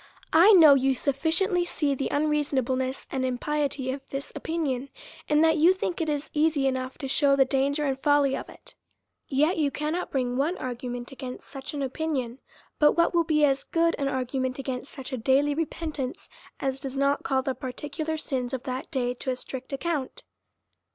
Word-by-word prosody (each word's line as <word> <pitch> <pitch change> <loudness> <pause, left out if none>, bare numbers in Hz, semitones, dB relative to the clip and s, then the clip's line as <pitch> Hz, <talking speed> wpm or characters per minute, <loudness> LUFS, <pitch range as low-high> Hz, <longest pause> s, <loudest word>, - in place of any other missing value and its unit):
I 360 +7 +8
know 320 -6 +9
you 270 0 +3
sufficiently 325 +7 +1
to 345 - -8
see 290 -3 0
the 270 0 -2
unreasonableness 270 -3 0
and 265 -1 -1
impiety 265 +1 -1
of 270 +1 -6
this 275 +1 -5
opinion, 280 -5 -2 0.4
and 300 +1 +4
that 320 0 +4
you 335 +4 +6
think 355 -2 -3
it 320 - -1
is 295 0 -3
easy 300 -2 +2
enough 260 -1 -2
to 275 - -5
shew 275 +1 +3
the 270 -1 +5
danger 280 +3 0
and 270 -1 -1
folly 290 -2 +3
of - - -6
it: - - -15 0.6
yet 305 +6 +2
you 295 -2 +2
cannot 305 +5 -3
bring 250 -2 -1
one 310 +7 0
argument 245 0 -5
against 260 -1 -8
such 275 +1 -7
an 280 -2 -1
opi 315 +5 -4
nion, 255 -4 -2 0.4
but 295 -1 +6
what 335 +1 +2
will 340 -1 +3
be 305 -2 +3
as 275 -1 +1
good 335 0 +1
an 280 - 0
argument 260 -1 -2
against 265 0 -5
such 265 -1 -8
a - - -1
daily 275 +5 +3
repentance, 305 -3 -4 0.3
as 270 0 -2
does 270 0 -5
not 280 +1 +2
call 265 -1 0
the 265 -1 -1
particu 285 +4 -5
lar 320 0 -1
sins 260 -4 -2
of 255 - -7
that 255 0 -4
day 245 -2 -1
to 255 - -5
a 255 - 0
strict 260 +1 -7
account. 310 - -3
275 Hz, 195 wpm, -26 LUFS, 260-305 Hz, 0.6 s, know